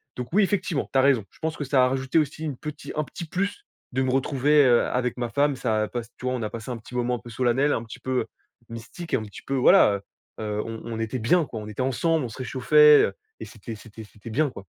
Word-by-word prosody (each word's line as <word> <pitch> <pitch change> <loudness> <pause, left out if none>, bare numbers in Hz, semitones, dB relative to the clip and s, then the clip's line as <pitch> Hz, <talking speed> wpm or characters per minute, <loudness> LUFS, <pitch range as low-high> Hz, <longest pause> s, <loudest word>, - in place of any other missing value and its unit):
Donc 125 -1 -5
oui, 205 +2 +5
effectivement, 185 -6 -1
tu - - +1
as - - +6
raison. 130 -7 +3
Je - - -23
pense 160 0 -3
que - - -3
ça 130 -1 +4
a - - +2
rajouté 130 +3 -1
aussi 155 +1 -2
une 145 -5 -3
petit, 150 +2 -7
un 155 - 0
petit 170 - -8
plus 195 - -3 0.3
de 130 - +1
me 130 - 0
retrouver, 140 +2 +3
heu, 120 -2 +4
avec 125 -1 -1
ma 120 -1 -2
femme, 140 +2 +1
ça 110 -4 0
passe 120 -2 -4
tu - - -9
vois, 130 0 0
on 125 - -4
a 105 - -2
passé 115 +1 -7
un 120 - -4
petit 115 +2 -14
moment 125 0 0
un - - -6
peu 120 - -12
solennel, 130 +4 +2
un 115 - -2
petit 115 - -10
peu, 130 - -5
heu, - - -4 0.4
mystique 115 +9 -9
et - - +5
un 110 - -4
petit 105 -2 -11
peu, 135 - -2
voilà, 105 -5 +5 0.4
heu, - - -4
heu, 105 0 -2
on 115 0 -6
on 115 -1 -5
était 115 +3 -2
bien 160 +10 +3
quoi. 115 -5 -7
On 105 - -8
était 105 +4 -5
ensemble, 150 +4 +1
on - - -5
se 110 - -11
réchauffait, 150 +4 +6
heu - - -4 0.3
et - - -6
c'était 115 0 -9
c'était 110 +1 -12
c'était 105 +2 -12
bien, 150 +4 +1
quoi. 100 - -11
125 Hz, 275 wpm, -25 LUFS, 115-145 Hz, 0.4 s, as